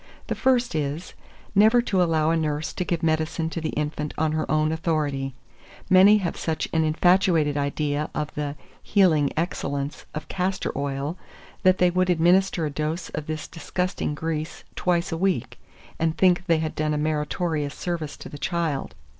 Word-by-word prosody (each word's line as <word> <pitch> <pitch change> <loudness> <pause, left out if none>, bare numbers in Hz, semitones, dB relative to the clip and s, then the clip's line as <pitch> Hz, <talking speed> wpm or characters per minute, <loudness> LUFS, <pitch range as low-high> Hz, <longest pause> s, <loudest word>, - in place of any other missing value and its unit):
The - - -2
first 250 -2 +2
is, 150 +2 -3 0.4
never 215 +4 +6
to 190 -5 +1
allow 160 -2 +2
a - - +2
nurse 155 0 -1
to 180 - -2
give 170 -1 -2
medicine 160 0 0
to 165 - -3
the 155 - -2
infant 150 0 -3
on 160 -1 +1
her 155 0 -2
own 155 0 +2
authority: 150 -5 -1 0.6
many 195 +3 +8
have 185 -5 -2
such 160 -1 -2
an 160 -1 +3
infatuated 160 -1 +3
idea 145 +1 -1
of 150 0 -3
the 145 -1 -3 0.3
healing 165 -8 +3
excellence 145 -4 -3
of 155 - -5
castor 185 +1 -2
oil, 140 +4 -3 0.4
that 185 0 +4
they 180 -1 +4
would 185 +1 +1
administer 175 0 +3
a 150 - -2
dose 155 +4 -3
of 150 -1 -5
this 155 -1 -4
disgusting 180 -2 -3
grease 160 +1 -4
twice 175 0 0
a 165 - -1
week, 185 -8 -1 0.4
and 160 0 0
think 180 0 +3
they 165 -2 +4
had 155 -1 -2
done 155 0 0
a - - -1
meritorious 150 0 -1
service 165 -4 -4
to - - -9
the 145 - -9
child. 160 - -2
160 Hz, 170 wpm, -25 LUFS, 150-180 Hz, 0.6 s, many